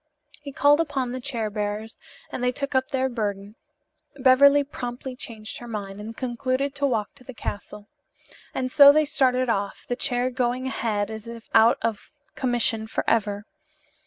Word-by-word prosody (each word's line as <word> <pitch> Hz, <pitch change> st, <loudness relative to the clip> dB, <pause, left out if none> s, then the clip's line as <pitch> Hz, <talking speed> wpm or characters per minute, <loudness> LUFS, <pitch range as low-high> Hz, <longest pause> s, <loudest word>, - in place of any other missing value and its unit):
He 285 Hz, -1 st, -8 dB
called 285 Hz, +3 st, +4 dB
upon 280 Hz, -6 st, -1 dB
the 255 Hz, -, -4 dB
chair 235 Hz, -5 st, -3 dB
bearers 210 Hz, +1 st, -4 dB, 0.3 s
and 250 Hz, -, -4 dB
they 250 Hz, -, +2 dB
took 280 Hz, +3 st, -4 dB
up 260 Hz, 0 st, +2 dB
their 265 Hz, -2 st, 0 dB
burden. 205 Hz, -4 st, -4 dB, 0.6 s
Beverly 280 Hz, +2 st, +6 dB
promptly 250 Hz, -1 st, -6 dB
changed 220 Hz, -3 st, -8 dB
her 240 Hz, -, -9 dB
mind 205 Hz, -3 st, -6 dB
and 225 Hz, +2 st, -8 dB
concluded 255 Hz, +2 st, -1 dB
to 280 Hz, 0 st, 0 dB
walk 220 Hz, -5 st, -1 dB
to 270 Hz, -, -16 dB
the 260 Hz, -1 st, -10 dB
castle. 205 Hz, 0 st, -7 dB, 0.6 s
And 255 Hz, -1 st, -3 dB
so 285 Hz, 0 st, +9 dB
they 305 Hz, +1 st, +3 dB
started 260 Hz, -4 st, +2 dB
off, 200 Hz, -3 st, -2 dB
the 245 Hz, -, -1 dB
chair 245 Hz, 0 st, 0 dB
going 250 Hz, 0 st, -1 dB
ahead 220 Hz, -5 st, -2 dB
as 220 Hz, 0 st, -8 dB
if 230 Hz, -1 st, -10 dB
out 225 Hz, +1 st, +6 dB
of 225 Hz, +5 st, -3 dB, 0.2 s
commission 240 Hz, -3 st, 0 dB
forever. 210 Hz, -2 st, 0 dB
245 Hz, 165 wpm, -24 LUFS, 220-265 Hz, 0.6 s, so